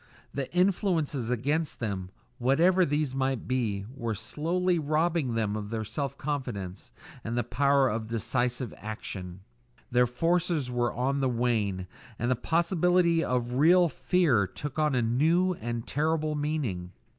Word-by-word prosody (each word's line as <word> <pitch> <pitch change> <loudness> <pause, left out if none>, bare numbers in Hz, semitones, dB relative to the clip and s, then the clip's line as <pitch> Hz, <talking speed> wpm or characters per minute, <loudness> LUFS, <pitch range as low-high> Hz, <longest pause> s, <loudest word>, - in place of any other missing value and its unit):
The 135 -2 -3
influences 175 - +1
against 145 +6 -1
them, 100 -5 -3 0.3
whatever 170 +9 +4
these 145 -2 0
might 135 -2 -1
be, 110 -6 -1
were 115 -5 -2
slowly 170 - 0
robbing 155 -3 +1
them 110 -2 0
of 110 +1 -4
self 140 +2 -3
confidence, 120 -11 -4 0.3
and 115 +2 -3
the 120 - +2
power 140 +3 +3
of 115 -2 -2
decisive 120 +2 -1
action; 95 -4 -7 0.5
their 125 0 +4
forces 165 +1 0
were 120 -1 +1
on 135 +3 0
the 135 -1 +1
wane, 110 -6 0 0.3
and 120 +2 0
the - - +3
possibility 170 - +2
of 125 -1 -1
real 170 +6 +5
fear 140 - +2
took 145 - -6
on 150 -3 +2
a 125 - +2
new 160 +11 +2
and 120 -6 -4
terrible 155 +1 0
meaning. 140 - -2
130 Hz, 140 wpm, -28 LUFS, 115-160 Hz, 0.5 s, real